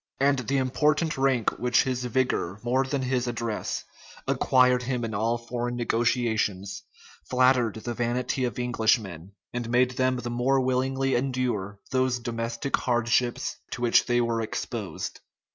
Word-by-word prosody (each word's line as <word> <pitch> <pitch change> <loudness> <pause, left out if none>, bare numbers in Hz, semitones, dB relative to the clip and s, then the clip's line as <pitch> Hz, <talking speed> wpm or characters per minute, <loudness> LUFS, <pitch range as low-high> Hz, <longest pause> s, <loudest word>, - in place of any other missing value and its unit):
And 140 0 +3
the 130 +3 -1
important 150 +5 +1
rank 135 -4 +1
which 125 -1 +3
his 125 -1 -2
vigor, 125 -6 0
more 130 +2 +2
than 135 0 -2
his 125 -1 0
address, 115 -2 -3 0.4
acquired 125 -1 +4
him 125 -1 -2
in 110 - -5
all 115 +3 +1
foreign 120 +1 -4
negotiations, 115 -4 0 0.5
flattered 125 -3 +3
the 120 +2 -4
vanity 120 +3 -1
of 120 - -4
Englishmen, 110 -7 0 0.2
and 120 -1 -3
made 125 +1 +3
them 130 0 +1
the 120 -1 -4
more 125 +3 +2
willingly 130 +1 0
endure 120 -6 -1
those 130 -1 +2
domestic 115 +2 -2
hardships 120 0 0
to - - -6
which 120 - +4
they 120 0 +2
were 115 -1 0
exposed. 110 - -4
120 Hz, 145 wpm, -26 LUFS, 115-130 Hz, 0.5 s, acquired